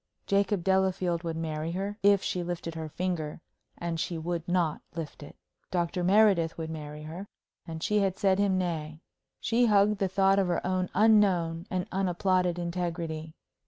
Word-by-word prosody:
Jacob 200 -2 +1
Delafield 190 -2 +1
would 165 -2 -3
marry 160 0 -3
her, 200 +3 -3
if 200 -1 +4
she 180 - -1
lifted 170 -1 -4
her 160 -1 -5
finger; 170 -3 -3 0.4
and 170 -1 -3
she 170 +1 -2
would 170 0 -3
not 175 -3 +1
lift 160 -3 -6
it. 145 - -11 0.3
Dr. 175 0 -1
Meredith 190 -4 +4
would 160 -1 -4
marry 150 -1 -7
her, 170 +6 -7 0.4
and 160 0 -6
she 210 0 +2
had 195 -2 0
said 195 -1 +2
him 200 -2 +2
nay. 160 -3 -3 0.4
She 240 +1 +3
hugged 205 -1 +4
the 195 - +2
thought 195 +1 +3
of 190 - +2
her 175 -1 -1
own 185 0 0
unknown 190 -5 +3
and 185 -1 -1
unapplauded 185 -1 +1
integrity. 170 -2 -3
175 Hz, 165 wpm, -29 LUFS, 165-195 Hz, 0.4 s, if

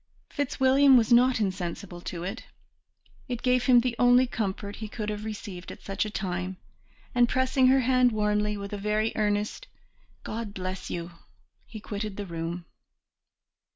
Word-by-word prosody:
Fitzwilliam 270 -1 +4
was 235 0 +3
not 250 0 +5
insensible 185 -2 -3
to 175 -1 -5
it. 195 +6 -5 0.8
It 245 -2 -4
gave 250 -1 +2
him 245 -2 +6
the 245 -1 -1
only 245 +1 +6
comfort 205 -3 -4
he 220 - -6
could 215 -1 -4
have 210 0 -4
received 200 -4 -7
at - - -12
such 195 +2 -2
a - - -4
time; 185 -2 -3 0.6
and 245 -1 +4
pressing 260 0 +3
her 265 +1 +5
hand 255 0 +4
warmly, 210 -1 0
with 200 0 -6
a 205 - -3
very 210 +2 0
earnest 210 - -1 0.6
"God 220 -2 -5
bless 185 0 -5
you!" 170 0 -4 0.6
he 220 - -9
quitted 205 -1 -5
the 205 - -4
room. 170 0 -5
210 Hz, 155 wpm, -27 LUFS, 195-245 Hz, 0.8 s, him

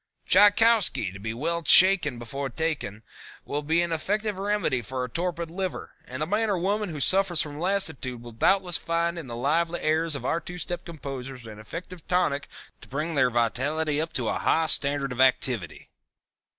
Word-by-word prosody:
Tchaikowski, 205 - +4
to 100 - -10
be 110 +3 -4
well 165 +9 -2
Tshaken 170 -5 +7
before 135 +4 -5
taken, 140 -8 -3 0.4
will 145 - -3
be 160 +3 +1
an 170 - -3
effective 205 +5 -2
remedy 200 -10 0
for 130 +3 -4
a 125 - -5
torpid 170 +2 -3
liver, 185 +1 -4
and 130 +4 -5
the - - -1
man 210 +5 0
or 200 - +1
woman 200 +3 -1
who 155 -3 -6
suffers 185 +2 +2
from 145 -1 -2
lassitude 160 -9 -1
will 120 - -10
doubtless 180 - +2
find 170 +2 -1
in 155 - -8
the 120 - -6
lively 165 +7 0
airs 160 0 0
of - - -6
our 165 - 0
two 175 - -8
step 175 0 -4
composers 135 -6 -8
an 110 -1 -10
efficient 170 +10 -9
tonic 150 -6 0 0.3
to - - -13
bring 150 +5 -3
their 130 -4 +3
vitality 145 +6 0
up 160 - -4
to - - -1
a - - -1
high 160 - +2
standard 140 -3 0
of 125 +1 -1
activity. 125 - +1
160 Hz, 185 wpm, -26 LUFS, 130-180 Hz, 0.4 s, Tshaken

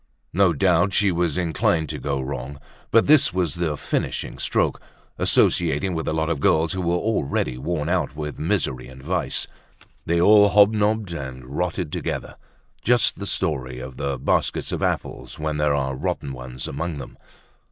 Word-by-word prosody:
No 95 -1 +4
doubt 90 +4 +2
she 100 -2 +4
was 85 -2 0
already 90 -2 0
inclined 80 0 +1
to - - -4
go 70 -1 -2
wrong. 70 +1 -5 0.3
But 115 - +5
this 150 -1 +5
was 90 -5 0
the 80 -4 -2
finishing - - -3
stroke—associating 85 +2 0
with 80 -1 -3
a - - +1
lot 80 0 0
of 75 - -1
girls 80 +3 +2
who 95 - -2
were 85 0 +1
already 85 - -1
worn 75 +1 -2
out 90 -5 0
with 75 -1 -5
misery 80 -7 -1
and 65 0 -13
vice. 90 +5 0 0.6
They 85 +1 +2
all 105 +3 +7
hobnobbed 105 -1 +3
and 65 -4 -6
rotted 85 +3 -3
together, - - -4 0.4
just 120 0 +2
the 100 - -4
story 65 -11 -1
of 65 0 -8
the 70 -1 -2
baskets 65 - 0
of - - -3
apples - - -3
when 75 0 -2
there 75 -1 +2
are 70 -1 -1
rotten 70 +1 -3
ones 65 0 -6
among 80 +2 -4
them. 70 - -9
80 Hz, 170 wpm, -23 LUFS, 70-90 Hz, 0.6 s, all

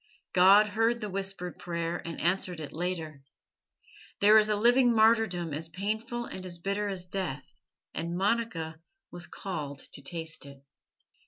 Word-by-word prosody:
God 195 +4 +7
heard 225 +3 +2
the 210 -3 -5
whispered 190 -2 -3
prayer, 170 0 -3
and 165 -1 -6
answered 180 0 0
it 150 -3 -7
later. 160 -4 -3 1.0
There 210 +2 +8
is 215 0 +3
a 210 - +3
living 240 +3 +4
martyrdom 220 -7 +3
as 160 +3 -3
painful 220 +6 -3
and 185 - -7
as 180 -2 -6
bitter 200 +4 -1
as 185 -2 -3
death, 175 -7 -4 0.4
and 170 +1 -3
Monica 190 -6 -1 0.3
was 175 0 -4
called 150 -7 -5 0.2
to - - -5
taste 160 +2 -4
it. 140 0 -14
185 Hz, 150 wpm, -29 LUFS, 165-210 Hz, 1.0 s, There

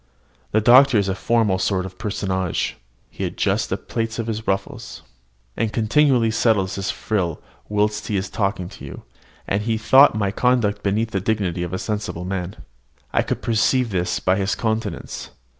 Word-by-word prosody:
The 110 - +2
doctor 125 +2 +7
is 100 -2 +1
a 95 - 0
formal 105 -1 +1
sort 95 -1 0
of 95 -1 -10
personage: 95 -4 -2 0.4
he - - -6
adjusts - - 0
the - - -2
plaits 115 -1 -4
of 115 - -2
his 110 -1 -4
ruffles, 95 0 -3 0.5
and 110 -2 -1
continually 120 +1 +3
settles 110 -4 +2
his 95 -1 -3
frill 100 -5 -2 0.3
whilst 105 0 0
he 105 - 0
is 95 +1 -2
talking 100 -3 -2
to 100 - -13
you; - - -9 0.4
and 100 - 0
he 110 +1 0
thought 130 +4 +6
my 100 -2 0
conduct 110 -3 +1
beneath 110 +3 0
the 95 - -1
dignity 95 -4 -1
of 85 -1 -3
a 95 - -2
sensible 105 -4 -4
man. 95 0 -4 0.6
I - - +3
could - - -3
perceive 115 +1 +2
this 90 -2 -1
by 95 +1 +1
his 100 0 0
countenance. 110 -5 -3
105 Hz, 175 wpm, -22 LUFS, 95-115 Hz, 0.6 s, doctor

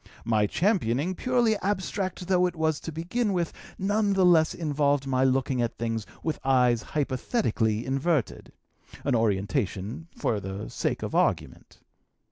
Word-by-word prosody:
My 110 -2 +2
championing, 175 - +1
purely 240 0 +1
abstract 190 -2 -2
though 180 -1 +3
it 175 - -5
was 160 -1 0
to 165 - -6
begin 195 +8 -1
with, 175 -2 -1 0.2
none 205 +1 +1
the 190 -1 +3
less 160 -3 +4
involved 145 -3 +1
my 130 -1 +1
looking 130 -1 +1
at 120 - -2
things 115 -2 -3 0.2
with 160 - -2
eyes 125 -3 +3
hypothetically 130 - -1
inverted, 135 0 -1 0.5
an 140 - +1
orientation 105 - -1
for 110 - 0
the 95 +1 -6
sake - - -2
of - - -4
argument. - - -1
145 Hz, 140 wpm, -27 LUFS, 115-180 Hz, 0.5 s, less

